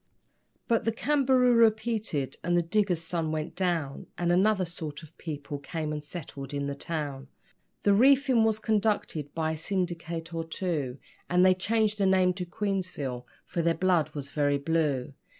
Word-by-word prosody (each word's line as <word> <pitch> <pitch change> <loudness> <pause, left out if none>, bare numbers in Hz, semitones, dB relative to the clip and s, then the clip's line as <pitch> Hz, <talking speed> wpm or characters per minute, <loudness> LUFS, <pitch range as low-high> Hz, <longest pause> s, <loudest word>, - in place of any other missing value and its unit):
But 230 -1 +2
the 225 - +1
Cambaroora 250 -3 +4
petered, 215 - -3
and 175 +1 +2
the 175 - +3
diggers' 180 -2 +1
sun 165 -2 -1
went 155 0 -3
down, 170 -7 -1
And 175 0 +1
another 190 +1 +3
sort 160 -2 -6
of 160 +1 -14
people 150 -2 -5
came 150 +2 -4
and 150 -1 -4
settled 145 -3 -7
in 140 0 -1
the 140 - -2
town; 140 -3 -4 0.6
The 205 - +5
reefing 260 +1 +5
was 220 -1 +2
conducted 210 - 0
by 160 -1 0
a 160 - -3
syndicate 170 -2 -3
or 165 0 -2
two, 160 -6 -3 0.3
And 180 +1 +4
they 185 - +7
changed 215 +2 0
the 195 - +3
name 185 -1 +4
to 180 -1 -5
'Queensville', 175 - -3 0.2
for 170 - -2
their 165 0 +2
blood 180 -3 +2
was 140 -1 -5
very 145 -1 +2
blue. 145 -3 0
170 Hz, 170 wpm, -28 LUFS, 150-205 Hz, 0.6 s, they